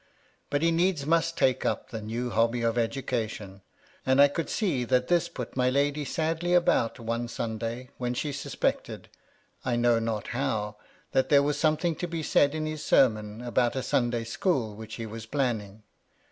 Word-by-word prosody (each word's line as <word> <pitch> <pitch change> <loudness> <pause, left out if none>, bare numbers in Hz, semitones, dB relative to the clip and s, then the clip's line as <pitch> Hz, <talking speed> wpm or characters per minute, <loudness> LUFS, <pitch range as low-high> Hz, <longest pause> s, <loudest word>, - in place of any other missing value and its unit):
But 145 +2 0
he 165 - +4
needs 170 -3 +1
must 165 +1 +1
take 130 -1 +2
up - - -2
the 110 -2 -5
new 120 +3 -3
hobby 115 +1 +1
of 115 0 +1
education; 115 -5 -2 0.4
and 130 +1 +2
I 140 0 +8
could 165 +3 -3
see 170 - 0
that 125 +1 +1
this 175 -2 +2
put 125 - -7
my 125 -1 +2
lady 145 +2 +1
sadly 165 +4 0
about 150 -10 +2
one 115 +1 -2
Sunday, 115 +1 -4
when 125 0 -1
she 145 +4 -2
suspected^ 140 0 -2 0.6
I 125 -2 0
know 120 -1 +3
not 115 -2 -3
how, 110 -5 -2 0.3
that 130 0 +2
there 140 -1 +6
was 145 0 0
something 160 +1 +2
to 175 - -3
be 165 -2 -4
said 145 0 +3
in 155 0 -2
his 155 -1 -4
sermon 110 -2 +2
about 120 0 +1
a 130 - -2
Sunday 120 -2 0
school 115 - -1
which 110 0 -8
he 115 - -5
was 110 +1 -8
planning. 110 -6 -2
125 Hz, 180 wpm, -28 LUFS, 115-150 Hz, 0.6 s, I